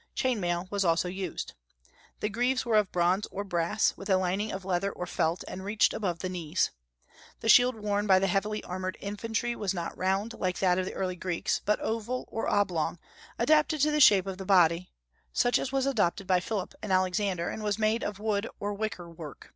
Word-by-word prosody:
Chain 255 -4 +1
mail 175 0 -1
was 200 -1 +1
also 170 0 +2
used. 185 -1 -5 0.7
The 210 - 0
greaves 245 +5 0
were 230 -2 +1
of 210 -3 +2
bronze 180 +3 +1
or 200 - -4
brass, 175 +2 +1
with 195 - -9
a 190 - +5
lining 190 +3 -1
of 190 -1 -6
leather 190 +1 0
or 180 - -5
felt, 165 0 -1
and 190 - -7
reached 210 +2 +2
above 180 -5 -2
the 185 - -4
knees. 175 -1 -1 0.7
The 225 - -1
shield 245 +2 +7
worn 210 -1 -1
by 190 -1 +6
the 190 - +2
heavy 205 +3 -1
armed 185 +1 -4
infantry 225 +4 -2
was 195 -4 -2
not 170 -1 -4
round, 195 +5 -1
like 185 -4 -2
that 180 -1 +2
of 185 - -1
the - - -6
early 185 -1 -2
Greeks, 180 -1 -2
but 210 - +1
oval 230 +3 -3
or 225 - -2
oblong, 180 -5 +1 0.4
adapted 305 +4 +3
to 305 +1 +4
the 300 - +1
shape 200 -7 +7
of 190 -1 -5
the - - -4
body, 180 -2 +4 0.4
such 245 - +3
as 260 - -3
was 270 -1 +1
adopted 205 -8 +1
by 185 -1 +3
Philip 195 +1 -4
and 215 -2 -4
Alexander, 185 -1 +1
and 220 - -6
was 210 -1 -1
made 220 +2 +1
of 205 -1 -3
wood 210 0 -1
or 205 0 -2
wicker 200 -4 -4
work. 160 -3 -10
195 Hz, 210 wpm, -29 LUFS, 180-215 Hz, 0.7 s, shield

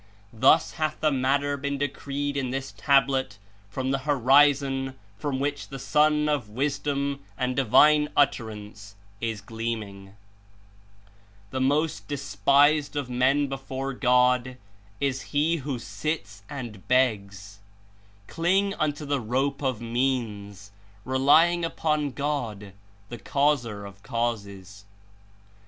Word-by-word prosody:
Thus 120 +4 +4
hath 155 0 -1
the 155 -1 +2
matter 140 +2 +1
been 140 0 -3
decreed 145 0 -3
In 135 -2 -1
this 135 +1 -4
Tablet 135 -6 +1 0.3
from 130 +6 -2
the 135 - 0
Horizon 135 0 +3 0.2
from 135 +4 -3
which 145 +1 -2
the 135 - -7
Sun 150 +2 +2
of 145 -8 -1
Wisdom 140 +3 -2 0.2
and 130 -1 -1
Divine 150 +4 +5
Utterance 105 -7 -1 0.2
Is 115 -3 -3
gleaming. 105 -3 -6 1.4
"The 130 - -2
most 150 +4 0
despised 140 +5 +2
of 140 -4 -3
men 130 +4 +2
before 135 0 -5
God 125 0 +2 0.4
Is 135 -2 -1 0.2
he 160 +3 +2
who 140 -3 -4
sits 115 -6 -5
and 120 -9 -8
begs. 100 -6 0 0.7
Cling 190 - +1
unto 150 0 -1
the 140 -2 -1
rope 135 +5 -1
of 130 -5 -1
means, 115 -5 -2 0.3
relying 150 +7 +4
upon 155 -3 0
God, 125 -9 -4 0.4
the 120 - -7
Causer 120 -9 0
of 100 0 -12
causes. 100 -5 -4
135 Hz, 115 wpm, -26 LUFS, 115-145 Hz, 1.4 s, Divine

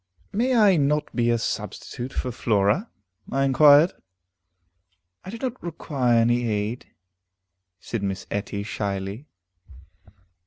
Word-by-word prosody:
"May 250 +5 +1
I 205 -5 +5
not 150 +1 0
be 120 -1 +2
a 120 - +3
substitute 120 +2 -5
for 125 - -3
Flora?" 110 - +1 0.4
I 135 +1 +1
inquired. 145 +5 +6 1.3
"I - - -9
do 225 - -6
not 255 +1 -4
require 140 -7 0
any 120 +1 +2
aid," 105 +3 -3 0.9
said 115 +3 -5
Miss 95 -1 -3
Etty 100 0 -3
shyly. 100 +4 -4
120 Hz, 115 wpm, -24 LUFS, 105-155 Hz, 1.3 s, inquired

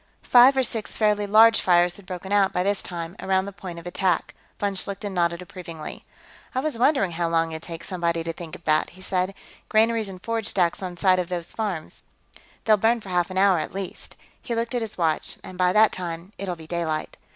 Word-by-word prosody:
Five 255 +2 +7
or 265 - +4
six 225 -3 -3
fairly 210 -1 +2
large 225 +2 +6
fires 175 -1 +3
had 200 -2 -16
broken 185 +1 -6
out, 200 -1 +4
by 180 -1 0
this 200 +1 0
time, 170 0 -6
around 190 0 +1
the 200 - -6
point 185 -3 -8
of 170 - -9
attack. 175 -1 0 0.3
Von 200 -1 0
Schlichten 200 +1 -3
nodded 170 0 0
approvingly. 170 -3 -9 0.5
"I - - +2
was 280 -4 -2
wondering 250 - +3
how 170 0 -1
long 165 0 +1
it'd 160 0 -6
take 165 0 -7
somebody 170 -2 -1
to 165 0 -3
think 170 0 -8
of 175 - -14
that," 155 0 +2
he - - -13
said. 185 +1 -1 0.3
"Granaries 220 -1 +2
and 185 -1 -9
forage 225 +2 -2
stacks 175 -2 +1
on 180 -2 -5
some 185 0 +4
of 180 -1 -2
these 175 -2 -4
farms. 195 -8 -4 0.6
They'll 215 -1 +5
burn 225 +3 +3
for 200 - -10
half 175 -1 +1
an 185 - -5
hour, 190 -2 +5
at 155 - -5
least." 195 -2 -6 0.3
He 235 - -3
looked 230 +2 -2
at 245 - 0
his 220 -2 -5
watch. 160 -3 0
"And 185 - -9
by 180 0 +3
that 215 +2 +5
time, 175 +1 -6
it'll 190 -2 -3
be 160 -1 -12
daylight." 160 -2 -3
185 Hz, 220 wpm, -24 LUFS, 170-205 Hz, 0.6 s, Five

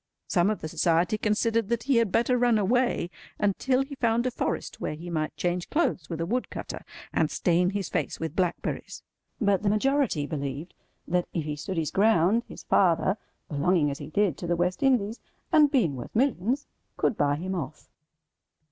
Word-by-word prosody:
Some 175 +1 +3
of 215 -4 -2
the - - -3
Society 170 +5 +2
considered 220 +1 +1
that 235 -1 0
he 270 -3 +2
had 230 -4 +2
better 240 +4 +2
run 240 -2 +3
away 215 -3 +1 0.3
until 255 +6 +1
he 275 +1 -9
found 235 -2 +1
a 255 - +1
forest - - -3
where - - -2
he 170 +3 -8
might 155 -2 -2
change 175 0 -1
clothes 300 - 0
with 165 -2 -4
a 165 - 0
wood 245 +8 -1
cutter, - - -6 0.3
and 155 - +2
stain 180 +1 +2
his 200 -1 -2
face - - -2
with 160 -1 -4
blackberries; 180 -3 -2 0.4
but 200 -4 +2
the 205 - +1
majority 250 - +1
believed 145 +2 -4 0.3
that 180 0 0
if 165 - 0
he 150 0 -3
stood 165 +5 -5
his 160 -3 -1
ground, 210 +1 +4
his - - -10
father—belonging 175 -3 +1
as 140 - -6
he 145 - -7
did 190 -4 +1
to 175 - -4
the 175 - +2
West 180 +1 0
Indies, 240 -5 +2 0.3
and 305 -3 +6
being 230 - +2
worth 120 - -8
millions—could 250 0 -1
buy 145 -3 +2
him 185 +5 -4
off. 155 -4 -5
190 Hz, 185 wpm, -27 LUFS, 165-230 Hz, 0.4 s, and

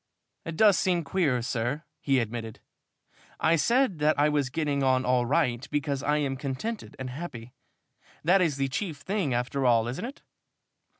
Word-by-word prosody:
"It 165 -1 -5
does 210 -5 +5
seem 175 -2 +1
queer, 140 -6 0
sir," 125 +5 -2 0.2
he 135 -2 +1
admitted. 115 -2 -3 0.8
"I 165 - +4
said 235 - +2
that 150 0 +2
I 150 +1 +4
was 145 -3 0
getting 145 0 -1
on 130 -1 +2
all 125 -1 +2
right 125 -4 +1
because 145 -2 -1
I 150 +1 +1
am 140 -3 -1
contented 145 - -5
and 130 -1 -5
happy. 125 -5 -7 0.7
That 180 +4 +4
is 155 -6 +1
the 135 0 0
chief 155 +3 -3
thing 190 -1 -2
after 125 +3 -1
all, 115 -2 +3
isn't 125 - -4
it?" 270 +3 -9
140 Hz, 170 wpm, -27 LUFS, 125-165 Hz, 0.8 s, does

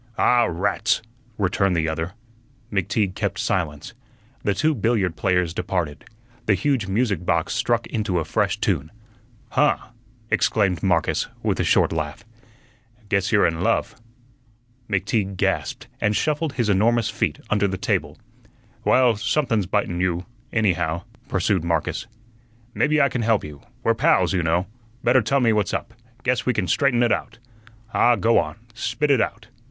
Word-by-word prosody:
"Ah, 120 -1 +4
rats!" 95 +6 0 0.3
returned 95 -1 +1
the 80 -1 +1
other. 80 +2 -3 0.6
McTeague 95 0 0
kept - - -2
silence. 75 -5 -2 0.5
The 100 - +1
two 155 +10 +2
billiard 110 - 0
players 90 +1 +1
departed. 85 -6 -3 0.4
The 105 - +4
huge 115 +1 0
music 100 -3 0
box 85 +1 0
struck 115 0 +1
into 105 -5 -2
a 80 - -1
fresh - - 0
tune. 75 +3 0 0.6
"Huh!" - - +3 0.5
exclaimed 100 -5 +2
Marcus, 85 -4 +1 0.2
with - - 0
a - - +2
short - - +3
laugh, 75 -1 -4 0.8
"guess 100 -1 +1
you're 105 -2 +4
in 80 0 0
love." - - +1 1.0
McTeague 100 0 -1
gasped, - - -1
and 105 0 +1
shuffled 155 +2 0
his 120 -4 0
enormous 110 +3 +2
feet - - -1
under 105 -1 +3
the 95 -1 -3
table. 100 - -1 0.7
"Well, 125 -4 +4
somethun's 115 - 0
bitun 90 -3 -1
you, 90 -1 0 0.3
anyhow," 90 -6 0 0.2
pursued 105 - +1
Marcus. 85 +5 -1 0.7
"Maybe 150 0 +2
I 140 - +5
can 130 -3 -2
help 110 -3 +2
you. 75 -2 -9 0.2
We're - - +3
pals, - - +3
you 90 - +1
know. 85 +2 +1 0.4
Better 125 +2 +4
tell 135 +5 +1
me 115 -2 +4
what's 105 -4 0
up; - - -5 0.3
guess - - +1
we - - +3
can - - 0
straighten 120 -3 +2
ut 120 - +2
out. 115 - -2 0.6
Ah, 120 0 +4
go 115 0 +3
on; 75 - -3 0.2
spit 145 +5 -1
ut 130 -5 +4
out." - - -3
100 Hz, 155 wpm, -23 LUFS, 90-115 Hz, 1.0 s, I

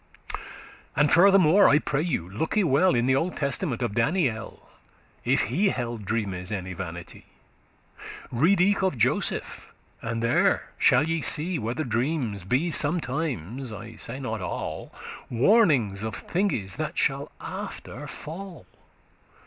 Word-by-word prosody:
And 150 +1 +3
furthermore, 190 0 +6
I 145 - +6
pray 150 -1 -1
you 155 - -2
looke 110 - -3
well 180 -2 +4
In 120 0 +2
the 130 +1 +3
Old 165 +6 -1
Testament, 140 -3 -1
of 115 -4 -2
Daniel, 115 - -1 0.6
If - - +2
he 175 - +1
held 120 - -4
dreames 100 -3 -2
any 95 -2 -4
vanity. 85 -1 -8 1.0
Read 165 +11 +3
eke 195 +3 +3
of 190 -8 0
Joseph, 115 - 0 0.3
and 115 0 -3
there 115 +1 +2
shall 130 +5 +4
ye 165 -1 0
see 165 +3 +1
Whether 115 +8 -2
dreams 120 - -1
be 135 - +1
sometimes 140 - -1
(I 110 +2 -8
say 130 +3 -5
not 110 -6 -4
all) 90 - -5 0.4
Warnings 125 - +3
of 110 0 -4
thinges 120 - -2
that - - -4
shall - - 0
after 145 +6 -7
fall. 170 +6 -8
130 Hz, 135 wpm, -26 LUFS, 110-165 Hz, 1.0 s, furthermore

